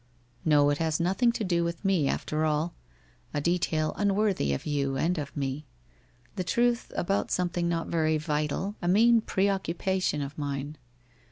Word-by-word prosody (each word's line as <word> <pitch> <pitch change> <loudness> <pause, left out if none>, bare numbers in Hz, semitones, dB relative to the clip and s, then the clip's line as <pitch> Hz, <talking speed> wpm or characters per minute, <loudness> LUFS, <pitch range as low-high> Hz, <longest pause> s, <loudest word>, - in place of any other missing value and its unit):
' 120 +5 -12
Xo, 145 -1 +5
it 145 - -1
has 160 -2 0
nothing 195 +8 +2
to 225 - -2
do 175 -3 +1
with 170 +3 -4
me, 185 -7 +2
after 155 +3 -1
all. 155 +2 0 0.6
A - - +1
detail, 160 -1 0
unworthy 200 - +1
of 70 - -3
you 140 -2 -1
and 165 +4 0
of 145 0 -6
me. 140 +1 -3 0.7
The 185 - 0
truth 240 +5 +1
about 195 +3 0
something 175 -1 0
not 165 -1 -1
very 155 -1 +1
vital, 150 +5 -2
a 175 - -2
mean 225 +5 +5
pre 195 -2 +1
occupation 190 -4 -1
of 140 +2 -7
mine. 145 +1 -4
165 Hz, 170 wpm, -28 LUFS, 150-190 Hz, 0.7 s, Xo